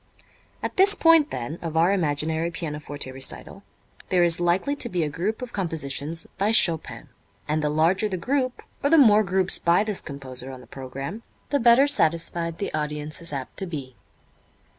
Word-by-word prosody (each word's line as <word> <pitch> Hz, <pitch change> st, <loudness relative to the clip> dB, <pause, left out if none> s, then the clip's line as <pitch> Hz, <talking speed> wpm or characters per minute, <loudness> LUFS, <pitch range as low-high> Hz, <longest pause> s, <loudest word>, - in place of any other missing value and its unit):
At -, -, -4 dB
this 395 Hz, +2 st, +6 dB
point, 325 Hz, -4 st, +5 dB
then, 135 Hz, +7 st, -5 dB
of 160 Hz, -1 st, -4 dB
our 170 Hz, +4 st, +4 dB
imaginary 160 Hz, -1 st, -1 dB
pianoforte 150 Hz, -5 st, -6 dB
recital 130 Hz, 0 st, -3 dB, 0.5 s
there 180 Hz, -1 st, +3 dB
is 170 Hz, -1 st, +4 dB
likely 175 Hz, +11 st, +1 dB
to 240 Hz, -, -1 dB
be 180 Hz, -5 st, -1 dB
a 150 Hz, -, -1 dB
group 200 Hz, -, -3 dB
of 245 Hz, -, -8 dB
compositions 160 Hz, -3 st, -3 dB
by 200 Hz, +2 st, +2 dB
Chopin; 170 Hz, -9 st, 0 dB, 0.4 s
and 155 Hz, +1 st, 0 dB
the 150 Hz, -, +1 dB
larger 175 Hz, +8 st, +2 dB
the 185 Hz, -, -3 dB
group, 255 Hz, +5 st, -1 dB, 0.2 s
or 285 Hz, -, +3 dB
the 325 Hz, -, +5 dB
more 215 Hz, -7 st, +7 dB
groups 190 Hz, -1 st, +2 dB
by 170 Hz, +4 st, +3 dB
this 210 Hz, -3 st, -1 dB
composer 135 Hz, -3 st, -8 dB
on 130 Hz, -1 st, -9 dB
the 125 Hz, -, -14 dB
program, 135 Hz, -, -7 dB, 0.3 s
the 285 Hz, -, +2 dB
better 240 Hz, +3 st, +6 dB
satisfied 170 Hz, -, +1 dB
the 200 Hz, -, -4 dB
audience 150 Hz, 0 st, -2 dB
is 170 Hz, -, -2 dB
apt 135 Hz, -3 st, -6 dB
to 190 Hz, -, 0 dB
be. 140 Hz, -7 st, -7 dB
170 Hz, 180 wpm, -24 LUFS, 150-210 Hz, 0.5 s, more